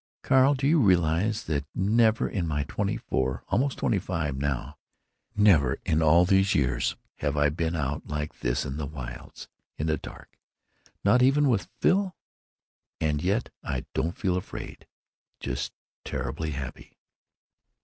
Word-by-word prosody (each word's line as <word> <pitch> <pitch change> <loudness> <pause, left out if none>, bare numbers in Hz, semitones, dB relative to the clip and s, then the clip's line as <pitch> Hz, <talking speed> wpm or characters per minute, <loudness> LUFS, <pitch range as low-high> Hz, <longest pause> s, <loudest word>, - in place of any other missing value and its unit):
Carl, 135 +2 +5
do 135 +1 -2
you 160 +2 +4
realize 95 - +2
that 75 -3 -1
never 110 +3 +3
in 90 -5 -2
my 75 -2 0
twenty 100 +8 -2
four 65 0 -2
(almost 135 +2 +1
twenty 100 - +1
five 80 -6 -2
now!) 70 -2 -2 0.6
never 80 -11 +4
in 80 0 +2
all 80 +3 +5
these 95 +1 +3
years 65 -3 +1 0.2
have 75 0 -1
I 75 0 +4
been 80 +2 -2
out 75 -1 -3
like 75 0 -4
this 60 +3 -1
in 70 0 -4
the 75 -2 -3
wilds, 65 -4 -8 0.3
in 75 - -2
the 80 -1 +1
dark, - - -12 0.6
not 105 +6 +4
even 140 +3 +4
with 110 -10 +1
Phil? 190 -1 +2 0.8
And 75 -2 0
yet 100 +6 0
I - - -3
don't 85 +3 -1
feel 90 -3 0
afraid—just 90 - -7 0.3
terribly 75 +6 -3
happy." 65 -2 -7
80 Hz, 145 wpm, -27 LUFS, 75-105 Hz, 0.8 s, Carl